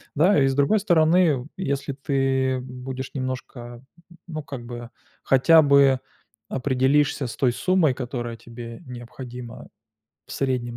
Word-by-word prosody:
Да, 165 +4 +4
и 135 - +4
с 135 - 0
другой 145 +10 +3
стороны, 165 - +3
если 140 -6 -2
ты 135 -1 0
будешь 130 +1 -7
немножко, 125 -2 -6 0.5
ну 155 -3 -5
как 135 -4 -8
бы 120 0 -8 0.3
хотя 160 +5 +6
бы 140 -2 +5 0.5
определишься 135 +1 +1
с 115 - -7
той 130 -3 +2
суммой, 175 +1 +2
которая 120 -2 -5
тебе 115 0 -10
необходима 125 -1 -9 0.6
в - - -10
среднем 125 -3 -2
130 Hz, 130 wpm, -24 LUFS, 125-145 Hz, 0.6 s, хотя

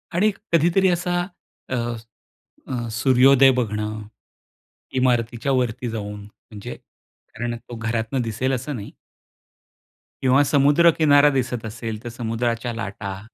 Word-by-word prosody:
आणि 210 +5 +3 0.2
कधीतरी 170 +4 +4
असा 175 0 0 0.5
अ, 130 - -1 0.9
अ, 120 -2 -3
सूर्योदय 130 +2 +5
बघणं, 105 -2 -2 1.0
इमारतीच्या 120 +1 +1
वरती 125 -1 -1
जाऊन, 105 -2 -5
म्हणजे 105 0 -10
कारण 120 +1 -9
तो 120 +1 -11
घरातून 115 +2 -2
दिसेल 120 +3 -1
असं 130 +3 -3
नाही. 105 -4 -7 1.3
किंवा 130 +2 +4
समुद्र 145 +4 +4
किनारा 145 -2 +6
दिसत 120 -2 -3
असेल, 110 0 -5
तर 120 - -5
समुद्राच्या 115 +1 -2
लाटा. 100 -3 -5
120 Hz, 110 wpm, -22 LUFS, 110-135 Hz, 1.3 s, किनारा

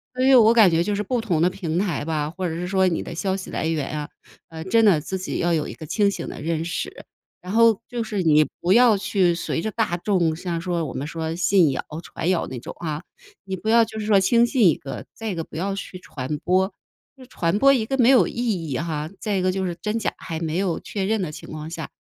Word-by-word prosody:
所 255 0 +1
以 270 - +6
我 225 -1 +7
感 220 -5 +7
觉 165 0 +2
就 210 - -1
是 205 - -1
不 240 +3 -1
同 175 -8 0
的 175 - +4
平 175 -3 -3
台 180 -7 -1
吧， 150 -1 -2
或 185 +2 -4
者 160 - -4
是 175 +2 -4
说 190 0 +2
你 170 -3 0
的 - - -7
消 190 +2 -1
息 190 - -8
来 - - -2
源 155 -4 -1
啊， 150 - -6 0.4
呃， 160 -1 -8
真 225 +4 +3
的 195 -8 +5
自 190 +5 -4
己 185 - -4
要 170 0 +1
有 155 -2 0
一 - - -7
个 155 - -9
清 200 +5 +2
醒 - - -5
的 - - -7
认 165 +1 -2
识。 170 - -5 0.4
然 180 +3 -6
后 230 -2 +5
就 240 -2 -3
是 210 -3 -2
你 155 -3 +5 0.2
不 180 +2 +2
要 235 -3 +6
去 190 -3 +2
随 170 -1 -2
着 220 - -3
大 175 -3 0
众 175 -3 +1
像 170 0 -3
说 175 -1 -2
我 135 - -6
们 140 +3 -4
说 160 0 -4
信 175 -2 +3
谣 - - -2 0.2
传 170 - -3
谣 185 -2 +1
那 130 -2 -6
种 - - -9
啊， 155 -1 -3 0.4
你 190 - -3
不 215 +4 -4
要 230 0 +6
就 220 0 -9
是 215 - -3
说 210 -2 +5
轻 235 +5 +4
信 235 -5 +3
一 160 - +4
个 135 - -8
再 225 -1 -5
一 - - -4
个 165 -1 -4
不 - - -14
要 195 +5 -2
去 195 -1 -6
传 150 -4 -5
播， 190 +4 +1 0.6
传 170 -2 0
播 275 +5 +6
一 230 -5 +1
个 270 +4 -2
没 250 -1 +5
有 240 -11 +6
意 - - -8 0.3
义 130 - -2
哈。 155 -2 -3
再 205 -3 -1
一 - - 0
个 185 0 +1
就 190 0 -1
是 175 - -2
真 210 +2 -1
假 220 - -1
还 160 - -6
没 160 0 -2
有 185 -3 -1
确 195 -2 -3
认 220 +1 0
的 170 -5 -3
情 - - -10
况 155 0 -7
下， 165 -1 -6
180 Hz, 285 characters per minute, -23 LUFS, 165-210 Hz, 0.6 s, 我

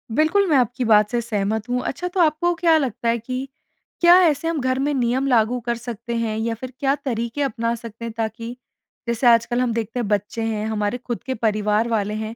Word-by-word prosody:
बिल्कुल, 320 +8 +3
मैं 295 - +4
आपकी 250 0 +1
बात 210 -2 +5
से 240 - +1
सहमत 220 0 -2
हूँ। 250 0 0
अच्छा 355 +1 -3
तो 360 +1 -4
आपको 335 +1 +3
क्या 330 -1 +4
लगता 245 -5 -1
है 235 - +2
कि, 255 +4 -5 0.5
क्या 345 0 +8
ऐसे 315 0 +1
हम 330 -2 -1
घर 260 0 0
में 285 +2 0
नियम 255 +1 0
लागू 245 -1 +2
कर 235 0 0
सकते 235 0 -6
हैं 220 -2 -1
या 230 +1 -1
फिर 255 +2 -8
क्या 275 -1 +2
तरीके 240 -2 -3
अपना 230 -4 -1
सकते 230 0 -9
हैं? 230 - -4
ताकि 230 +2 -4 0.5
जैसे 235 +1 +1
आजकल 235 +1 +4
हम 240 -2 0
देखते 230 +1 -3
हैं 235 - -2
बच्चे 205 +2 -1
हैं, 215 -1 -2
हमारे 210 +1 -1
खुद 240 -1 -6
के 260 - -3
परिवार 215 0 +1
वाले 210 -2 0
हैं, 220 +1 -4
235 Hz, 220 wpm, -22 LUFS, 220-265 Hz, 0.5 s, क्या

